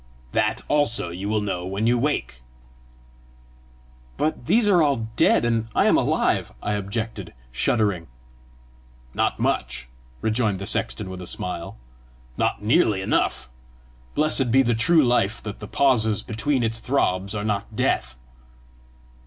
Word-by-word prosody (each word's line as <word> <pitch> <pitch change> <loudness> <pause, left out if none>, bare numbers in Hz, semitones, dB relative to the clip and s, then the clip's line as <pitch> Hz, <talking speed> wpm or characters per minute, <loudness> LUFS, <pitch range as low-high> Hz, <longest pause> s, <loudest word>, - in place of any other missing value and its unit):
"That - - 0
also 145 -11 +2
you 95 +4 -5
will 105 0 +1
know 95 -4 -3
when 100 +4 -2
you 120 +1 +3
wake." 120 - -2 1.8
"But 150 -5 -2
these 225 -1 +4
are 185 -4 +5
all 135 -7 +1
dead, - - +3
and 115 -1 0
I - - +3
am - - +4
alive!" - - +1
I 105 - -2
objected, 100 - -4 0.2
shuddering. 100 - 0 1.1
"Not - - 0
much," 60 0 -2 0.3
rejoined 110 -2 0
the 100 - -6
sexton - - 0
with 90 0 -7
a 90 - -7
smile, 85 -2 -5 0.3
" 65 0 -28
not 105 - -1
nearly 110 - +2
enough! - - 0 0.7
Blessed 150 -4 +2
be 135 +3 +5
the 120 -1 +1
true 150 +8 +4
life 115 -4 +1
that 105 -2 -7
the 105 - -8
pauses 110 -5 +2
between 125 +4 -1
its 115 0 -1
throbs 100 -7 0
are 105 0 -3
not 105 -2 -3
death!" 60 0 0
110 Hz, 145 wpm, -23 LUFS, 95-125 Hz, 1.8 s, are